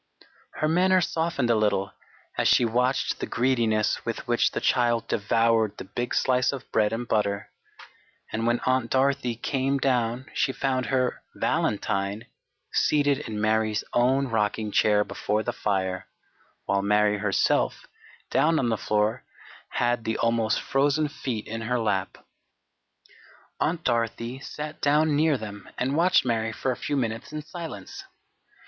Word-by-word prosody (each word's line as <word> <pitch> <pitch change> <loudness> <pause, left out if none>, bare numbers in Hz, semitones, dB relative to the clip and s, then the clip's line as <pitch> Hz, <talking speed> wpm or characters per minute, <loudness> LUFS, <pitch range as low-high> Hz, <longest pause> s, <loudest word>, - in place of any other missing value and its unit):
Her 155 - 0
manner 185 +3 +4
softened 160 -7 0
a - - +4
little 105 -2 +1 0.4
as - - +1
she 120 - +5
watched 125 +3 0
the - - -3
greediness 115 -4 +1
with - - -4
which - - +3
the - - -3
child 120 -2 +1
devoured 110 0 +1
the - - -6
big 120 +5 -4
slice 125 -1 +2
of 140 -3 -6
bread 105 -1 +2
and 115 +2 -3
butter, 100 -2 -1 0.8
and 115 +1 -1
when 120 0 +1
Aunt 130 -2 +1
Dorothy 135 -2 +1
came 135 +3 -1
down 125 -2 0
she - - +1
found 130 -2 -1
her 130 -2 0
"valentine" 100 +1 -1 0.5
seated 145 -2 +2
in 110 -7 -5
Mary's 110 0 +1
own 130 +3 +3
rocking 105 -2 -1
chair 105 0 +3
before 105 +1 -2
the - - -2
fire, 95 -2 -2 0.6
while 100 0 +1
Mary 105 +1 +2
herself, 100 -2 +1 0.5
down 160 +1 +3
on 125 -5 +1
the 110 - 0
floor, 105 +4 0 0.5
had 120 -1 0
the 110 0 -1
almost 115 -2 +1
frozen 145 +2 +1
feet 120 -7 -4
in 115 +1 -5
her 125 +2 -1
lap. 100 -4 -1 1.4
Aunt 165 0 0
Dorothy 115 +1 -1
sat 150 +2 -7
down 150 +1 +3
near 155 -1 +3
them 105 -3 -9
and 135 +3 0
watched 175 0 +4
Mary 115 -2 0
for 130 +4 -2
a - - -2
few 145 - -2
minutes 115 -1 -3
in 155 0 -5
silence. 160 - -8
120 Hz, 150 wpm, -26 LUFS, 110-135 Hz, 1.4 s, she